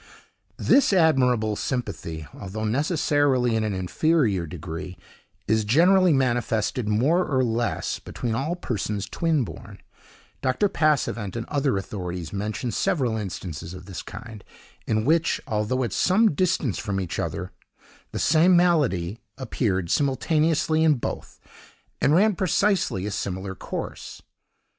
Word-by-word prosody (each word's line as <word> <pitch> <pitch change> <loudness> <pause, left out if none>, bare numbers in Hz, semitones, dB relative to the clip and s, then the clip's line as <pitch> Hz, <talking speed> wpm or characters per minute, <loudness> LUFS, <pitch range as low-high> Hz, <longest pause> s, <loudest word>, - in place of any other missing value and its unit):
This 275 -7 +4
admirable 125 - +3
sympathy, 100 -11 -4
although 105 +2 -6
necessarily 140 - +1
in 110 - +1
an 105 -2 -1
inferior 100 - +1
degree, 90 +2 -7 0.5
is 110 +1 +2
generally 180 - +5
manifested, 120 -4 0
more 140 +12 +3
or 130 -6 +1
less, 115 0 -1
between 120 -2 -4
all 140 +9 -1
persons 105 - -3
twin 155 - 0
born. 85 -8 -10 0.6
Dr. 130 +11 +1
Passavent 130 - 0
and 115 -1 -3
other 140 -7 +1
authorities 90 -4 -5
mention 110 +5 -3
several 125 - 0
instances 90 -5 -5
of 90 -1 -11
this 95 -3 -6
kind, 115 -4 -10 0.4
in 110 0 0
which, 165 +3 +2
although 115 +1 -1
at 115 -6 -3
some 205 +1 +3
distance 165 - 0
from 100 -2 -2
each 90 -3 -4
other, - - -3 0.6
the - - -5
same 170 +4 +4
malady 125 - +2 0.2
appeared 95 -9 -1
simultaneously 155 +3 +2
in 155 -2 +5
both, 120 - -6 0.6
and 145 - +4
ran 210 +4 +4
precisely 185 - +1
a 105 - -3
similar 95 -1 -4
course. - - -7
120 Hz, 130 wpm, -24 LUFS, 100-155 Hz, 0.6 s, generally